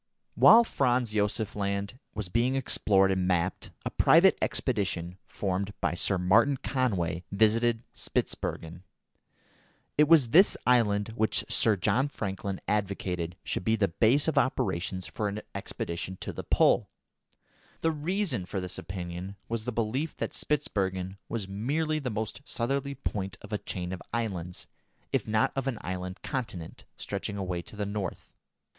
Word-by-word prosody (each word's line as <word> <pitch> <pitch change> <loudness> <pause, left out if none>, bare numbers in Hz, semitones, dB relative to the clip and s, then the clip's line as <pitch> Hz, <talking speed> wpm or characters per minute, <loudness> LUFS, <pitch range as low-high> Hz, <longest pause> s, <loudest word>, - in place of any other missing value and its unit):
While 235 +1 +8
Franz 125 - +1
Josef 105 0 0
Land 100 +3 -2 0.2
was 105 -3 -2
being 120 +7 +1
explored 100 -7 +3
and 95 -1 0
mapped, 90 -1 0 0.2
a - - -2
private - - +6
expedition 90 -2 -1
formed 100 +1 -2
by - - 0
Sir 95 +2 +1
Martin 110 +10 +4
Conway 95 - -1
visited 115 +3 +3
Spitzbergen. 85 +2 -3 1.2
It 150 - +7
was 145 -7 +5
this 190 +6 +6
island 110 -4 +3
which 110 -1 0
Sir 110 -2 +3
John 125 +8 +2
Franklin 100 -6 -4
advocated 95 -4 -1
should - - -2
be 110 +3 +2
the 105 -3 +1
base 120 - +3
of 160 - +3
operations 95 -7 -1
for 105 - -3
an 105 +1 -4
expedition 85 +2 -5
to - - -4
the - - -6
Pole. - - +3 0.9
The 165 - +2
reason 155 - -1
for 95 - -3
this 90 -1 -5
opinion 90 +1 -6
was 115 -1 -2
the 125 - -1
belief 120 +7 -2
that - - -3
Spitzbergen 95 -9 -1
was 110 -4 -3
merely 150 +11 -1
the 135 -4 -3
most 110 +2 -4
southerly 140 +2 -2
point 100 -7 -4
of 105 +1 -9
a 105 - 0
chain 90 0 -4
of 95 - -6
islands, 95 -7 -3 0.5
if - - 0
not 110 0 +2
of 135 0 -2
an 130 -4 -1
island 90 0 -5
continent, 105 - -5
stretching 100 - -4
away 90 -3 -2
to 105 - -11
the 105 0 -2
north. 100 -1 -5
105 Hz, 150 wpm, -29 LUFS, 95-125 Hz, 1.2 s, While